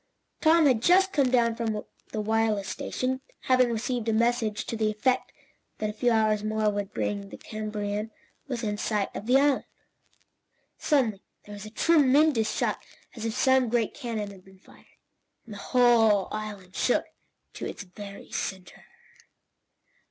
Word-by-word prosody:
Tom 325 0 +5
had 255 -6 +3
just 380 +7 +4
come 275 -4 +3
down 235 -2 +3
from 230 -2 -2 0.4
the 215 - -2
wireless 215 -2 +1
station, 260 +1 -3 0.2
having 255 -2 +3
received 235 0 -2
a - - +2
message 225 -2 +1
to - - -4
the 215 -1 +1
effect 250 +5 0 0.5
that 215 -1 -2
a - - -13
few 245 +3 +1
hours 215 -2 +2
more 215 0 +1
would 205 -1 -4
bring 200 -1 -3
the - - -9
CAMBARANIAN 210 0 -4 0.4
within 230 -6 -3
sight 210 -3 -1
of 215 - -6
the 255 +2 +5
island. 285 0 +2 1.1
Suddenly 240 - +1 0.2
there 205 - -10
was 205 +1 -8
a - - -8
tremendous 280 -2 +3
shock, - - -1 0.3
as 225 -2 -6
if 225 0 -2
some 260 -1 +3
great 230 -2 0
cannon 220 -6 -4
had 190 -2 -14
been 190 0 -18
fired, - - -20 0.6
and 225 - -10
the 205 - -8
whole 225 -4 +4
island 205 -4 -6
shook 245 - +1 0.5
to - - -5
its - - -7
very 200 +1 -11
centre. 190 -2 -5
220 Hz, 160 wpm, -27 LUFS, 210-250 Hz, 1.1 s, Tom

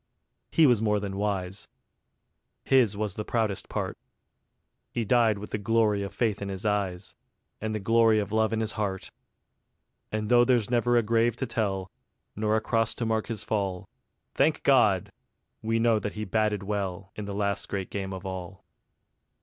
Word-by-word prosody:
He 165 - +5
was 120 -6 +4
more 105 -2 +2
than 100 -1 -4
wise. 100 -1 -2 1.0
His 120 -7 +3
was 105 -2 -1
the 105 - -4
proudest 110 -4 -1
part. - - -3 0.9
He 115 - -2
died 115 -2 +3
with 105 +1 -8
the 105 - -2
glory 105 -1 +2
of 100 -1 -4
faith 105 0 -1
in 100 - -3
his 95 +1 -5
eyes, 100 -3 -1 0.5
And 110 0 -2
the - - -1
glory 115 +2 +4
of 105 -1 -1
love 110 0 +2
in 110 0 0
his 110 0 0
heart. 100 -3 -3 1.0
And 110 0 -2
though 120 +1 +6
there's 120 -3 +2
never 120 0 +3
a 120 - +3
grave 115 +1 +2
to 130 - -3
tell, 95 -6 -2 0.4
Nor 105 +1 +1
a 110 - +1
cross 115 0 0
to 120 - -3
mark 110 -1 0
his 115 -3 -4
fall, 95 -4 -2 0.5
Thank - - +2
God! - - +4 0.5
we 115 +1 0
know 115 -1 +3
that 105 - -4
he 110 0 -4
"batted 105 0 0
well" 95 -2 -3
In 105 - -5
the 100 -1 -5
last 100 -1 -1
great 95 -2 -4
Game 95 -1 -4
of 95 0 -7
all. 95 0 -7
105 Hz, 180 wpm, -27 LUFS, 100-115 Hz, 1.0 s, though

